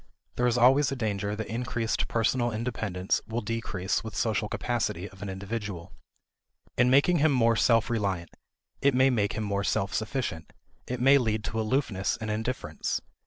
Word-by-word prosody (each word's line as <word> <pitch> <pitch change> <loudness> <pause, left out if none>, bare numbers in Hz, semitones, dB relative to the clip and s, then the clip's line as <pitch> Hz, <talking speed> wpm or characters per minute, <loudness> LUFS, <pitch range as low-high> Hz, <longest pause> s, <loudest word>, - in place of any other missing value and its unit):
There 125 - +2
is 120 0 +2
always 130 +3 +5
a - - -1
danger 105 -4 -2
that 110 +1 -4
increased 115 +1 -2
personal 120 +1 +1
independence 110 -5 -2
will 115 +2 -2
decrease 105 -3 -2
the 110 - -6
social 110 -1 -1
capacity 110 -8 -2
of 95 -1 -15
an 100 - -4
individual. 95 -2 -5 0.8
In 125 0 +4
making 145 +6 +4
him 155 +1 +4
more 115 -3 +3
self 115 0 +3
reliant, 100 -7 -2 0.5
it 140 -2 +3
may 130 +1 +5
make 105 -4 +1
him 110 - -3
more 100 -1 -1
self 95 0 0
sufficient; 110 - -3 0.3
it 125 0 -3
may 135 +3 +6
lead 110 -3 -1
to 110 +1 -2
aloofness 110 -4 0
and 110 -1 -3
indifference. 115 +4 -2
115 Hz, 165 wpm, -28 LUFS, 100-125 Hz, 0.8 s, may